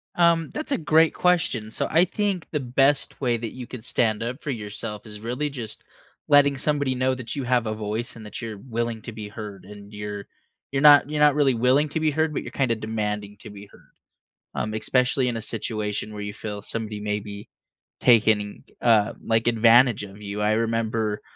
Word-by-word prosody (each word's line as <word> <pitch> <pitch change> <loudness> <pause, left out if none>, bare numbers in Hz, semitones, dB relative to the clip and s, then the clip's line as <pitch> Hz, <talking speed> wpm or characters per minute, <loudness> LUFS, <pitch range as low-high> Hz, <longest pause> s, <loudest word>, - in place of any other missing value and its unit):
Um, 170 -2 +3
that's 305 0 -5
a - - +2
great 160 0 +3
question, 155 -12 +1
so - - -1
I 165 +2 +5
think 200 -2 -2
the 150 - 0
best 135 +3 +1
way 120 -3 +1
that 115 -1 -6
you 125 -1 -7
could 120 -2 -9
stand 110 -3 +1
up 120 +5 -4
for - - -6
yourself 105 -2 -6
is 105 -1 -10
really 125 +6 -2
just 120 -6 -7 0.4
letting 145 -1 +5
somebody 145 -2 0
know 130 +1 +1
that 125 -3 -6
you 140 - -3
have 125 -1 +1
a 110 - -2
voice 110 +2 -4
and 110 -2 -11
that 105 - -7
you're 110 -3 -6
willing 115 0 -4
to 120 - -7
be 105 -1 -7
heard, 105 -2 -8
and 100 +1 -12
you're 105 -1 -6 0.5
you're 135 - +1
not 145 -1 +7
you're 150 0 -1
not 150 -1 +6
really 140 -3 +3
willing 130 +5 +3
to 155 - -2
be 155 -1 +2
heard, 155 +1 0
but - - -3
you're - - -8
kinda 125 -4 +1
demanding 105 -2 -4
to - - -11
be 100 0 -11
heard. - - -21 0.6
Um, 110 - -2
especially 125 +3 +1
in 120 - -1
a 115 - -4
situation 105 -1 -2
where 105 - -6
you 105 0 -5
feel 105 -1 -6
somebody 110 0 -4
may 105 0 -2
be 100 0 -9 0.5
taking, 110 -3 +3 0.2
uh, 110 -3 +4
like, 115 +1 +1
advantage 115 0 +5
of 100 +1 -11
you. 105 0 -5
I 105 - +2
remember 110 -1 -1
115 Hz, 205 wpm, -24 LUFS, 105-135 Hz, 0.6 s, not